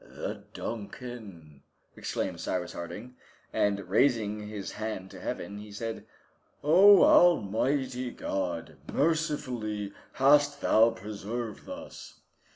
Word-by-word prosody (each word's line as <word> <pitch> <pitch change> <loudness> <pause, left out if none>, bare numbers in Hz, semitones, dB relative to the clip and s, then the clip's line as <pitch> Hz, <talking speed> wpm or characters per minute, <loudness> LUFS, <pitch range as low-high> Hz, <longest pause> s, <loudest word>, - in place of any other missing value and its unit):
"The - - -7
'Duncan'!" 100 - -7 0.3
exclaimed - - -3
Cyrus 90 -1 -2
Harding. 110 +9 -8 0.4
And 100 -2 +1
raising 105 -1 +1
his 105 -2 -6
hand 105 -3 -5
to - - -10
Heaven, 100 0 -5
he 105 0 -10
said, 115 +2 -5 0.6
"Oh! 190 +6 +8
Almighty 130 - +3
God! 90 -7 -4
mercifully 130 -10 -1 0.2
hast 145 +1 +4
Thou 115 +1 +5
preserved 105 - -6
us!" 280 0 -9
110 Hz, 100 wpm, -29 LUFS, 100-135 Hz, 0.6 s, Oh